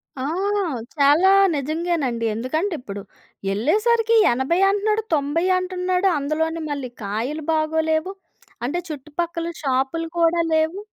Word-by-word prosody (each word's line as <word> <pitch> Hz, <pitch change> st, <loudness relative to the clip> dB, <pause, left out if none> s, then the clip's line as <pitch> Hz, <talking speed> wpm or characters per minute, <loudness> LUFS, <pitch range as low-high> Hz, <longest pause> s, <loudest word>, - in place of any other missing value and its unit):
ఆ! 260 Hz, -, -5 dB, 0.7 s
చాలా 295 Hz, +6 st, +5 dB, 0.3 s
నిజంగానండి. 295 Hz, -5 st, -1 dB
ఎందుకంటే, 315 Hz, -, -1 dB
ఇప్పుడు 200 Hz, -5 st, -7 dB, 0.5 s
ఎళ్ళేసరికి 440 Hz, -, +2 dB, 0.2 s
80 265 Hz, +8 st, 0 dB
అంటున్నాడు. 425 Hz, +2 st, +1 dB
90 295 Hz, +3 st, +1 dB
అంటున్నాడు. 365 Hz, +1 st, 0 dB
అందులోని 320 Hz, +3 st, -1 dB
మళ్ళీ 280 Hz, -3 st, -4 dB
కాయలు 235 Hz, +10 st, -3 dB
బాగోలేవు. 315 Hz, +3 st, 0 dB, 0.5 s
అంటే 290 Hz, +8 st, -1 dB
చుట్టుపక్కల 330 Hz, +3 st, -4 dB, 0.2 s
షాప్‌లు 270 Hz, +5 st, 0 dB
కూడా 335 Hz, 0 st, +3 dB
లేవు. 315 Hz, +4 st, +1 dB
315 Hz, 105 wpm, -22 LUFS, 275-350 Hz, 0.7 s, చాలా